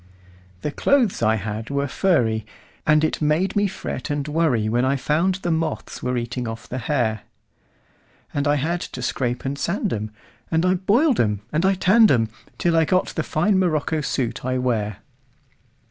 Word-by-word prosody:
The 150 Hz, -, -2 dB
clothes 245 Hz, -, +2 dB
I 110 Hz, -1 st, +3 dB
had 110 Hz, +2 st, -4 dB
were 140 Hz, 0 st, 0 dB
furry, 120 Hz, -, +1 dB, 0.4 s
And 155 Hz, 0 st, +4 dB
it 155 Hz, -, 0 dB
made 155 Hz, +5 st, +1 dB
me 205 Hz, 0 st, +3 dB
fret 180 Hz, -8 st, -5 dB
and 145 Hz, -1 st, -1 dB
worryWhen 125 Hz, -7 st, +1 dB
I 135 Hz, +1 st, +2 dB
found 160 Hz, +7 st, +1 dB
the 180 Hz, -2 st, -2 dB
moths 160 Hz, -1 st, -2 dB
were 125 Hz, 0 st, -1 dB
eating 120 Hz, +1 st, -3 dB
off 115 Hz, -1 st, -7 dB
the 130 Hz, -, -4 dB
hair; 120 Hz, -7 st, 0 dB, 1.1 s
And 145 Hz, +1 st, 0 dB
I 145 Hz, -, +3 dB
had 165 Hz, +5 st, -1 dB
to 125 Hz, -, -6 dB
scrape 125 Hz, -1 st, -2 dB
and 140 Hz, +1 st, -3 dB
sand 195 Hz, +5 st, -1 dB
'em, 110 Hz, 0 st, -3 dB, 0.4 s
And 165 Hz, +1 st, +1 dB
I 185 Hz, -, +4 dB
boiled 225 Hz, -, +2 dB
'em 105 Hz, -2 st, +1 dB
and 165 Hz, +5 st, +2 dB
I 195 Hz, -, +3 dB
tanned 210 Hz, +4 st, +5 dB
'em, 115 Hz, -4 st, +2 dB, 0.3 s
Till 170 Hz, -1 st, +1 dB
I 165 Hz, -, +5 dB
got 185 Hz, +3 st, +1 dB
the 160 Hz, -, -2 dB
fine 190 Hz, +6 st, +1 dB
morocco 160 Hz, -3 st, 0 dB
suit 125 Hz, -3 st, -2 dB
I 130 Hz, 0 st, -1 dB
wear. 110 Hz, -5 st, -1 dB
145 Hz, 175 wpm, -22 LUFS, 120-175 Hz, 1.1 s, tanned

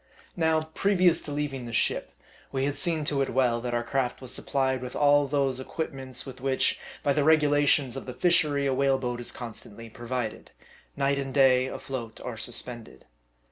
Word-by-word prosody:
Now, 160 Hz, -2 st, +2 dB
previous 180 Hz, +1 st, +2 dB
to 145 Hz, -, -7 dB
leaving 140 Hz, -4 st, -3 dB
the -, -, -6 dB
ship, 115 Hz, -, 0 dB, 0.4 s
we 135 Hz, 0 st, 0 dB
had 145 Hz, 0 st, -1 dB
seen 165 Hz, -4 st, +1 dB
to 140 Hz, -1 st, +1 dB
it 135 Hz, -, 0 dB
well, 120 Hz, -2 st, +1 dB
that 120 Hz, 0 st, -2 dB
our 120 Hz, -, 0 dB
craft 125 Hz, +1 st, -1 dB
was 130 Hz, -1 st, -7 dB
supplied 130 Hz, -1 st, -1 dB
with 125 Hz, 0 st, -7 dB
all 145 Hz, -1 st, +4 dB
those 135 Hz, -2 st, 0 dB
equipments, 130 Hz, -2 st, -5 dB
with 130 Hz, -2 st, -10 dB
which, 135 Hz, 0 st, +1 dB, 0.2 s
by 140 Hz, -, +2 dB
the 145 Hz, -, +1 dB
regulations 145 Hz, -4 st, +3 dB
of 135 Hz, -, -7 dB
the 125 Hz, -, -5 dB
fishery, 145 Hz, -2 st, +2 dB
a 135 Hz, -, +1 dB
whale 135 Hz, 0 st, +2 dB
boat 125 Hz, -2 st, -3 dB
is 120 Hz, -, -4 dB
constantly 115 Hz, -1 st, -9 dB
provided: 120 Hz, -1 st, -4 dB, 0.5 s
night 140 Hz, 0 st, +1 dB
and 135 Hz, 0 st, -5 dB
day, 130 Hz, -2 st, +5 dB
afloat 120 Hz, -4 st, -6 dB
or 125 Hz, -, -5 dB
suspended. 120 Hz, 0 st, -1 dB
135 Hz, 180 wpm, -27 LUFS, 125-145 Hz, 0.5 s, day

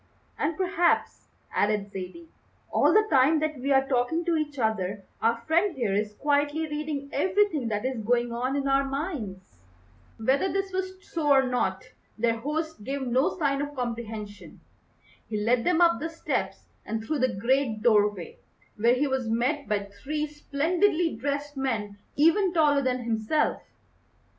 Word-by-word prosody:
"And 305 Hz, +1 st, -1 dB
perhaps," 365 Hz, -2 st, +1 dB, 0.3 s
added 205 Hz, -1 st, 0 dB
Zaidie, 200 Hz, -, -8 dB, 0.4 s
"all -, -, +4 dB
the 430 Hz, 0 st, +5 dB
time 280 Hz, +3 st, +5 dB
that 310 Hz, -2 st, -2 dB
we 275 Hz, +3 st, -1 dB
are 270 Hz, 0 st, +4 dB
talking 270 Hz, +6 st, 0 dB
to 340 Hz, -1 st, +2 dB
each 300 Hz, -2 st, -2 dB
other 205 Hz, -4 st, -1 dB, 0.2 s
our 230 Hz, +1 st, +1 dB
friend 340 Hz, +5 st, +2 dB
here 230 Hz, -6 st, -1 dB
is 210 Hz, +1 st, -1 dB
quietly 290 Hz, +3 st, +1 dB
reading 295 Hz, -2 st, -4 dB
everything 365 Hz, -, +1 dB
that 210 Hz, +1 st, -2 dB
is 260 Hz, -3 st, -2 dB
going 240 Hz, +2 st, +1 dB
on 255 Hz, +3 st, -1 dB
in 280 Hz, -1 st, -1 dB
our 275 Hz, 0 st, +3 dB
minds." 250 Hz, -, -5 dB, 0.6 s
Whether 270 Hz, +11 st, +1 dB
this 390 Hz, 0 st, -2 dB
was 375 Hz, 0 st, -4 dB
so 320 Hz, -3 st, -2 dB
or 270 Hz, -1 st, +6 dB
not 245 Hz, -7 st, -1 dB, 0.3 s
their 230 Hz, 0 st, +1 dB
host 300 Hz, 0 st, -3 dB
gave 275 Hz, +4 st, -3 dB
no 255 Hz, +6 st, +1 dB
sign 280 Hz, -4 st, +1 dB
of 290 Hz, 0 st, -5 dB
comprehension. 225 Hz, -4 st, -6 dB, 0.7 s
He 215 Hz, -, -2 dB
led 235 Hz, +3 st, +2 dB
them 355 Hz, -1 st, +2 dB
up 335 Hz, -1 st, +5 dB
the 325 Hz, -, -3 dB
steps 325 Hz, -, -3 dB, 0.2 s
and 220 Hz, +1 st, -4 dB
through 300 Hz, +6 st, -2 dB
the 255 Hz, -5 st, +1 dB
great 235 Hz, 0 st, 0 dB
doorway, 205 Hz, -5 st, +2 dB, 0.4 s
where 235 Hz, +3 st, +4 dB
he 275 Hz, +3 st, +1 dB
was 265 Hz, -4 st, -1 dB
met 260 Hz, +6 st, 0 dB
by 205 Hz, -1 st, +1 dB, 0.2 s
three 300 Hz, +1 st, -2 dB
splendidly 320 Hz, +4 st, 0 dB
dressed 285 Hz, +4 st, -3 dB
men 215 Hz, -7 st, -2 dB, 0.2 s
even 340 Hz, +5 st, +4 dB
taller 295 Hz, -3 st, +4 dB
than 255 Hz, -2 st, -1 dB
himself. 230 Hz, +6 st, 0 dB
270 Hz, 160 wpm, -27 LUFS, 225-310 Hz, 0.7 s, or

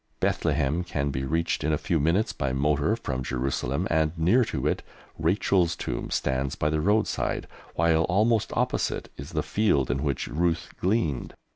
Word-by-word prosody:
Bethlehem 75 Hz, +6 st, +1 dB
can 70 Hz, -5 st, -2 dB
be 65 Hz, 0 st, -3 dB
reached 80 Hz, +5 st, 0 dB
in 80 Hz, -, +1 dB
a 75 Hz, -, +2 dB
few 85 Hz, -1 st, 0 dB
minutes 85 Hz, +9 st, +1 dB
by 70 Hz, -2 st, -2 dB
motor 75 Hz, +8 st, +1 dB
from 65 Hz, -, -4 dB
Jerusalem, 65 Hz, +6 st, -1 dB
and 80 Hz, +1 st, +1 dB
near 95 Hz, +11 st, +4 dB
to 115 Hz, -, -3 dB
it -, -, +1 dB, 0.4 s
Rachel's 85 Hz, +1 st, +2 dB
tomb -, -, -4 dB
stands 65 Hz, 0 st, -1 dB
by 75 Hz, -, 0 dB
the 75 Hz, 0 st, +1 dB
roadside, 105 Hz, +5 st, +1 dB, 0.3 s
while 80 Hz, 0 st, +3 dB
almost 110 Hz, +4 st, +2 dB
opposite -, -, -1 dB
is -, -, -9 dB
the -, -, 0 dB
field 90 Hz, -, +1 dB
in 70 Hz, -, -1 dB
which 70 Hz, -4 st, -1 dB
Ruth 85 Hz, +2 st, 0 dB
gleaned. 90 Hz, -, 0 dB
80 Hz, 165 wpm, -26 LUFS, 70-90 Hz, 0.4 s, near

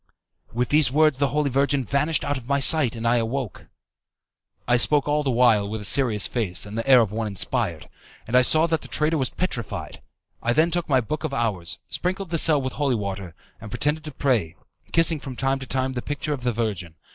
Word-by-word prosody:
"With 125 Hz, +2 st, -2 dB
these 150 Hz, -4 st, +3 dB
words 155 Hz, -1 st, +3 dB
the 140 Hz, 0 st, +1 dB
Holy 145 Hz, -1 st, -1 dB
Virgin 140 Hz, 0 st, +1 dB
vanished 150 Hz, +7 st, 0 dB
out 145 Hz, -, -1 dB
of 125 Hz, -3 st, -8 dB
my 140 Hz, 0 st, +2 dB
sight, 140 Hz, -3 st, +4 dB
and 115 Hz, 0 st, -3 dB
I 120 Hz, +1 st, +3 dB
awoke." 120 Hz, 0 st, -4 dB, 1.0 s
I 120 Hz, -, +3 dB
spoke 145 Hz, +4 st, +2 dB
all 150 Hz, 0 st, +1 dB
the 140 Hz, -, -2 dB
while 115 Hz, -5 st, +3 dB
with 110 Hz, +1 st, -4 dB
a -, -, -8 dB
serious 110 Hz, -2 st, +2 dB
face 100 Hz, -8 st, -2 dB
and 105 Hz, +1 st, -9 dB
the 115 Hz, +3 st, -4 dB
air 130 Hz, -2 st, +8 dB
of 110 Hz, -3 st, -1 dB
one 110 Hz, 0 st, -3 dB
inspired, 100 Hz, -, -2 dB, 0.4 s
and 115 Hz, -, -3 dB
I 125 Hz, -, +7 dB
saw 155 Hz, +5 st, +4 dB
that 160 Hz, -2 st, -1 dB
the -, -, -11 dB
traitor 150 Hz, +6 st, 0 dB
was 130 Hz, -, 0 dB
petrified. 125 Hz, -, -4 dB, 0.4 s
I 120 Hz, -, 0 dB
then 160 Hz, +5 st, +2 dB
took 175 Hz, -1 st, -2 dB
my 130 Hz, -2 st, +3 dB
Book 150 Hz, +7 st, -5 dB
of 145 Hz, -3 st, -3 dB
Hours, 95 Hz, -, -2 dB
sprinkled 185 Hz, 0 st, -4 dB
the 165 Hz, -, +2 dB
cell 155 Hz, -2 st, +5 dB
with 130 Hz, -1 st, -4 dB
holy 140 Hz, -3 st, 0 dB
water, 100 Hz, -5 st, -5 dB, 0.3 s
and 110 Hz, -, -9 dB
pretended 150 Hz, +8 st, -1 dB
to 155 Hz, -, -6 dB
pray, 120 Hz, -, -1 dB, 0.4 s
kissing 165 Hz, -1 st, +3 dB
from 135 Hz, -2 st, -8 dB
time 135 Hz, +2 st, 0 dB
to 130 Hz, -, -8 dB
time 130 Hz, +1 st, -1 dB
the 125 Hz, -, -4 dB
picture 145 Hz, +2 st, -3 dB
of 135 Hz, -, -6 dB
the 125 Hz, 0 st, 0 dB
Virgin. 105 Hz, -8 st, -4 dB
130 Hz, 225 wpm, -23 LUFS, 115-150 Hz, 1.0 s, air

